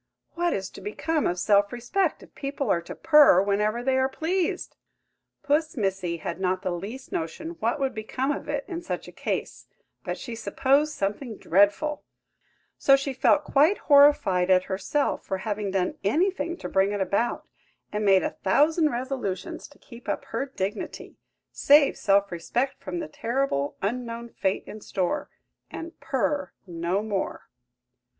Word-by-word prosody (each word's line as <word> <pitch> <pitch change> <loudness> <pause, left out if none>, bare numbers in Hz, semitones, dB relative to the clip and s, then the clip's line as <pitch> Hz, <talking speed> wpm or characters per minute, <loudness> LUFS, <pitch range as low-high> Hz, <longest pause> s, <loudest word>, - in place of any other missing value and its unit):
What 345 0 0
is 195 -1 -3
to - - -11
become 310 +9 -1
of 175 - -1
self 200 +2 +3
respect 305 +9 -1
if - - -17
people 275 -4 -2
are 170 - +2
to 170 - -9
purr 300 - +6
whenever 210 +4 +1
they 265 0 +2
are 260 0 +2
pleased?" 335 +5 -2 0.7
Puss 300 +1 +1
Missy 190 -5 -1
had 170 +2 -5
not 185 0 0
the 185 - -1
least 205 +10 -6
notion 165 - -4
what 235 +7 0
would 270 -2 0
become 255 +5 -2
of 290 - -5
it 285 -1 -2
in 345 -2 -5
such 340 - -5
a - - -9
case, - - -4 0.4
but - - -3
she 240 - -7
supposed 270 +7 +1
something 210 +2 -3
dreadful; 205 - +2 0.8
so 275 - +6
she 275 0 -2
felt 290 +3 +3
quite 300 +7 +3
horrified 280 - +5
at 185 -1 +5
herself 195 +11 -1
for 190 - -3
having 210 0 -3
done 190 -1 -1
anything 340 - 0
to - - -6
bring 195 +1 +2
it 205 - -2
about, 200 +5 -1 0.4
and 210 0 -2
made 195 -3 +5
a - - -1
thousand 305 - +3
resolutions 240 -8 -4
to 290 - -20
keep 245 +1 -12
up - - -2
her 275 - -3
dignity, 205 -5 -5 0.3
save 285 0 +5
self 200 0 +2
respect 245 +11 -2
from 350 - -4
the 320 -3 -4
terrible 250 - -1
unknown 235 +2 -3
fate 195 -3 -1
in 215 - -9
store, 185 -3 -2 0.4
and 330 +1 -8
purr 285 +1 -1
no 175 +3 -2
more. 205 -3 -3
235 Hz, 160 wpm, -26 LUFS, 195-285 Hz, 0.8 s, purr